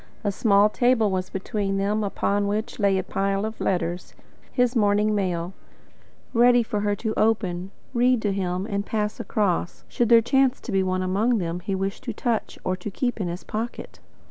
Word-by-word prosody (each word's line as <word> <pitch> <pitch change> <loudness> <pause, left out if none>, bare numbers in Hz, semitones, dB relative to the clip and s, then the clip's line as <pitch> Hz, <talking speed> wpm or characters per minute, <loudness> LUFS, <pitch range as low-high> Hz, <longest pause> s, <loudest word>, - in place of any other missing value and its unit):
A 205 - +1
small 200 0 +4
table 225 -1 +2
was 185 -1 -2
between 195 0 -2
them, 205 +2 0
upon 200 0 0
which 215 +3 -3
lay 200 -2 +3
a 190 - -1
pile 195 +2 -1
of 220 0 -6
letters 175 -1 -2 0.4
his 250 0 +1
morning 210 -1 +3
mail 180 -3 -1 0.8
ready 240 0 +5
for 210 -2 -2
her 205 0 0
to 220 +2 -3
open, 190 -5 0 0.2
read 250 0 +3
to 205 -2 +1
him, 185 -1 -2
and 200 -2 -2
pass 210 0 -2
across, 190 -5 -1
should 235 -2 0
there 235 -1 +8
chance 265 +3 +2
to 240 - -6
be 195 -1 +2
one 185 0 0
among 210 +6 +1
them 175 -2 -2
he 195 +2 -3
wished 195 +5 -3
to 235 - -3
touch 230 0 -2
or 185 - 0
to 185 +3 -6
keep 245 +3 -2
in 185 - -1
his 175 +1 -5
pocket. 225 +3 -5
205 Hz, 190 wpm, -24 LUFS, 190-225 Hz, 0.8 s, there